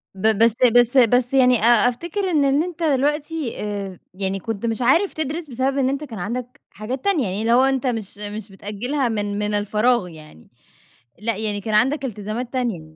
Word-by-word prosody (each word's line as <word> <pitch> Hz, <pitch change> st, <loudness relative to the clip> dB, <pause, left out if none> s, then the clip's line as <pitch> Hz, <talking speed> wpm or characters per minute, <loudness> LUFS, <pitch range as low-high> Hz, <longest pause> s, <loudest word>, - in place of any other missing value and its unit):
ب 215 Hz, +2 st, +2 dB
بس 230 Hz, -1 st, +4 dB
بس 245 Hz, +1 st, +4 dB
بس 245 Hz, +1 st, +4 dB
يعني 250 Hz, -2 st, +5 dB
أ 240 Hz, +1 st, +5 dB
أفتِكر 345 Hz, +9 st, -3 dB
إن 295 Hz, -4 st, +2 dB
إن 280 Hz, +3 st, +2 dB
أنت 345 Hz, -1 st, -6 dB
دلوقتي 295 Hz, -1 st, 0 dB
آآ، 200 Hz, -3 st, -5 dB
يعني 195 Hz, 0 st, -3 dB
كنت 225 Hz, +2 st, -4 dB
مش 225 Hz, +2 st, -1 dB
عارف 330 Hz, +11 st, +3 dB
تدرِس 315 Hz, +1 st, -4 dB
بسبب 260 Hz, +3 st, -1 dB
إن 265 Hz, -1 st, +2 dB
أنت 280 Hz, +2 st, -3 dB
كان 230 Hz, -8 st, -8 dB
عندك 245 Hz, +6 st, -5 dB
حاجات 245 Hz, +5 st, -6 dB
تانية، 380 Hz, -9 st, +2 dB
يعني 195 Hz, +1 st, -3 dB
اللي 230 Hz, +1 st, +2 dB
هو 255 Hz, +2 st, +5 dB
أنت 270 Hz, -1 st, +1 dB
مش 220 Hz, -5 st, -4 dB
مش 210 Hz, 0 st, -7 dB
بتأجِّلها 235 Hz, +7 st, -3 dB
من 205 Hz, -2 st, -2 dB
من 210 Hz, 0 st, -1 dB
الفراغ 210 Hz, +1 st, +1 dB
يعني، 155 Hz, -, -14 dB, 0.7 s
لأ، 220 Hz, -1 st, -2 dB
يعني 210 Hz, -2 st, -2 dB
كان 215 Hz, +2 st, -4 dB
عندك 270 Hz, +6 st, +2 dB
التزامات 225 Hz, +2 st, -5 dB
تانية. 240 Hz, -10 st, -1 dB
240 Hz, 190 wpm, -21 LUFS, 210-270 Hz, 0.7 s, يعني